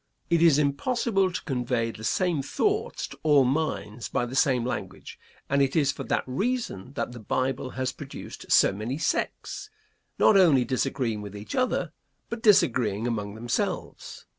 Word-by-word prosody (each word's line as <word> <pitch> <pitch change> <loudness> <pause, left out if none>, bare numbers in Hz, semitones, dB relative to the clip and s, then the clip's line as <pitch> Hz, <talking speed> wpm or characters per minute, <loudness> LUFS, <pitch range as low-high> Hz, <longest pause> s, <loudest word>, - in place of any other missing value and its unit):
It 170 -1 +4
is 165 -4 +6
impossible 195 - +1
to 175 - -4
convey 125 -4 -1
the 110 - -11
same 170 +4 +1
thoughts 425 - -1
to - - -12
all 145 -3 +5
minds 125 -5 -2
by 130 -3 0
the 125 +2 -6
same 130 -3 +3
language, 100 -6 -6 0.3
and 140 0 +2
it 135 -1 +1
is 145 -3 +3
for - - -7
that - - 0
reason 140 - -2
that - - -3
the 120 - -9
Bible 130 +4 -1
has 130 -1 0
produced - - -9
so - - +5
many 110 +7 -4
sects, 400 - -2 0.5
not 215 - +5
only 155 -10 +5
disagreeing 130 -3 -1
with 105 0 -8
each 105 - -8
other, 255 0 0 0.4
but 235 -1 -4
disagreeing 120 - +3
among 105 -4 -3
themselves. 120 +2 -3
135 Hz, 165 wpm, -26 LUFS, 115-165 Hz, 0.5 s, is